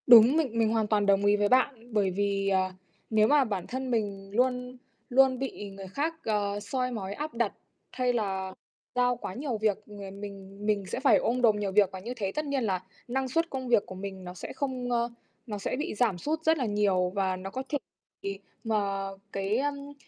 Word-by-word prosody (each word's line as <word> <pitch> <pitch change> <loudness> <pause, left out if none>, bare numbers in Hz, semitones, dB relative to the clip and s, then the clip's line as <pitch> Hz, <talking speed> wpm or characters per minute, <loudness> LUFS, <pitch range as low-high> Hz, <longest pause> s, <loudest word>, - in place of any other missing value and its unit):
Đúng. 240 +4 +9
Mình 255 -8 0
mình 225 -1 +4
hoàn 220 -1 +1
toàn 210 -1 +2
đồng 200 0 +4
ý 205 0 +5
với 205 0 +2
bạn, 250 -2 +2
bởi 200 -3 +2
vì, 200 +1 0
ờ, 190 -1 +2 0.4
nếu 215 -1 +4
mà 290 +1 +5
bản 200 -7 -3
thân 260 0 -3
mình 200 -4 -1
luôn 250 +1 +1 0.3
luôn 260 0 +5
bị 255 -6 -4
người 195 0 -9
khác, 295 - -1
à, 205 -2 0
soi 250 +4 -2
mói 200 -4 -4
áp 300 +7 -4
đặt 235 -3 0 0.4
hay 250 -1 +1
là 190 -4 -1 0.4
giao 245 0 +3
quá - - -5
nhiều 255 +1 -2
việc, 215 -2 +2
ờ, 200 -2 -8
mình 200 0 -8
mình 205 -2 +1
sẽ 185 - -3
phải 270 +1 +6
ôm 250 +2 0
đồm 225 -3 +5
nhiều 200 -2 -1
việc, 200 -1 +5
và 190 - -6
như 230 +6 -5
thế 200 -5 -2
tất 305 +6 -2
nhiên 280 -3 0
là 185 -4 0 0.2
năng 265 +2 -1
suất 330 +6 +1
công 260 -1 -4
việc 235 -4 +4
của 185 - -8
mình 190 0 -6
nó 180 0 -7
sẽ 180 - -7
không, 255 -3 -2
ơ 235 0 +1 0.4
nó 210 -2 -3
sẽ 200 - -2
bị 295 +4 -2
giảm 215 -4 +2
sút 310 - -2
rất 320 0 +4
là 260 - 0
nhiều, 200 -4 +2
và 190 -2 +1
nó 185 +1 -6
có 260 +6 -4
thể 295 - +1 0.4
bị 195 0 -4 0.2
mà 200 -3 0 0.2
cái, 195 +2 0
ưm, 285 +1 -2
215 Hz, 220 wpm, -29 LUFS, 195-255 Hz, 0.4 s, Đúng